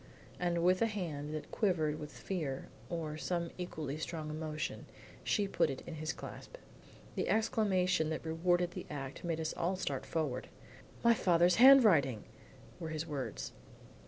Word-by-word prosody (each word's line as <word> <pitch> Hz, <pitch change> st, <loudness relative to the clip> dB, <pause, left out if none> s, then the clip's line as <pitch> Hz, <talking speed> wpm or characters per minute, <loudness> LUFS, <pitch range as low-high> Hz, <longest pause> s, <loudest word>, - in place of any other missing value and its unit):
And 170 Hz, -1 st, +1 dB
with 185 Hz, +1 st, +4 dB
a 230 Hz, -, +5 dB
hand 160 Hz, -9 st, -4 dB
that 155 Hz, -, -6 dB
quivered 160 Hz, -8 st, +1 dB
with 150 Hz, -1 st, -7 dB
fear 150 Hz, -9 st, -4 dB, 0.2 s
or 155 Hz, -2 st, -3 dB
some 170 Hz, 0 st, -2 dB
equally 155 Hz, -5 st, -4 dB
strong 155 Hz, -1 st, -4 dB
emotion, 155 Hz, +2 st, -4 dB, 0.4 s
she 205 Hz, -1 st, +1 dB
put -, -, +2 dB
it 135 Hz, -, -5 dB
in 170 Hz, -, -6 dB
his 155 Hz, -1 st, -3 dB
clasp. -, -, -9 dB, 0.6 s
The -, -, -1 dB
exclamation 190 Hz, -6 st, +2 dB
that 160 Hz, +1 st, -3 dB
rewarded 175 Hz, +2 st, +1 dB
the -, -, -7 dB
act 135 Hz, -2 st, -6 dB
made 165 Hz, -2 st, -1 dB
us 160 Hz, -1 st, -2 dB
all 180 Hz, +3 st, 0 dB
start 145 Hz, -8 st, -3 dB
forward. 145 Hz, -6 st, -2 dB, 0.6 s
"My 235 Hz, 0 st, +7 dB
father's 175 Hz, -4 st, +4 dB
handwriting!" 210 Hz, -, +7 dB, 0.6 s
were 165 Hz, -2 st, -4 dB
his 155 Hz, 0 st, -3 dB
words. 145 Hz, -5 st, -4 dB
165 Hz, 155 wpm, -34 LUFS, 150-180 Hz, 0.6 s, My